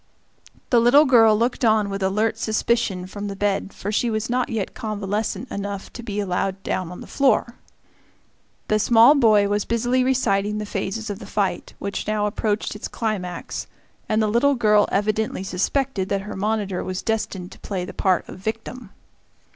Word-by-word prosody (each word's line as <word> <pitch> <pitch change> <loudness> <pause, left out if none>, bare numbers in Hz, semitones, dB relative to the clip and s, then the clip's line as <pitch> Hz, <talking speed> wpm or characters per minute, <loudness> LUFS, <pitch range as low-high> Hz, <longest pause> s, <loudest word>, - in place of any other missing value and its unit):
The 240 - +6
little 260 +6 +6
girl 225 -5 +6
looked 240 +3 0
on 215 -2 +3
with 195 0 -4
alert 210 +4 +1
suspicion 215 -4 0
from 205 +2 -6
the 200 - -5
bed, 200 0 -1
for 205 - -5
she 235 +3 +1
was 220 +1 -2
not 250 0 0
yet 220 -4 -3
convalescent 215 +3 -3
enough 200 0 -5
to - - -7
be 210 -3 -4
allowed 195 0 -2
down 180 -2 -2
on 180 - -9
the - - -8
floor. 265 -3 +1 1.1
The 215 - +2
small 230 +5 +6
boy 215 -7 +4
was 205 0 0
busily 245 +2 +1
reciting 210 -6 +1
the 210 - -3
phases 205 +2 -3
of 200 - -6
the - - -10
fight, 200 -3 -2
which 200 0 -4
now 210 -1 0
approached 210 0 -1
its 210 - -5
climax, 185 -6 -4 0.4
and 220 0 +2
the - - +2
little 250 +6 +3
girl 210 -3 +3
evidently 215 0 0
suspected 195 +2 -1
that 200 -1 0
her 210 +2 -7
monitor 205 -2 -1
was 185 0 -4
destined 200 -4 -2
to - - -13
play 185 -3 -4
the - - -8
part 185 -3 +1
of - - -10
victim. 225 +2 -5
210 Hz, 180 wpm, -23 LUFS, 195-230 Hz, 1.1 s, The